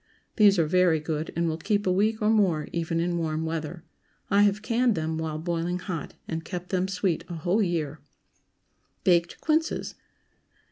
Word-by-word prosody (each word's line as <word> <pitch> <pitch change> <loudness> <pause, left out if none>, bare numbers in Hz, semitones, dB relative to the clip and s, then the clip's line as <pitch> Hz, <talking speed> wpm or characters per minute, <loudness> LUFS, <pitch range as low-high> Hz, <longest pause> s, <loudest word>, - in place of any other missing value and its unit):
These 205 -3 +6
are 165 - +3
very 175 0 +3
good, 155 0 -3
and 170 0 +1
will 160 0 -2
keep 205 +4 0
a 185 - +2
week 215 +4 +1
or 215 - +4
more, 185 -9 +2
even 165 -1 -1
in 175 0 0
warm 160 -1 -2
weather. 160 +1 -4 0.5
I 200 +1 +5
have 205 +1 +2
canned 240 -1 +2
them 160 0 -2
while 160 -1 -3
boiling 170 +2 -2
hot, 180 -5 -5
and 160 0 -4
kept 180 +1 -6
them 185 -1 0
sweet 190 -3 -1
a 175 - -5
whole 175 +7 +1
year. 160 -6 -1 1.0
BAKED 175 -2 +2
QUINCES. 315 +1 0
175 Hz, 175 wpm, -26 LUFS, 160-200 Hz, 1.0 s, These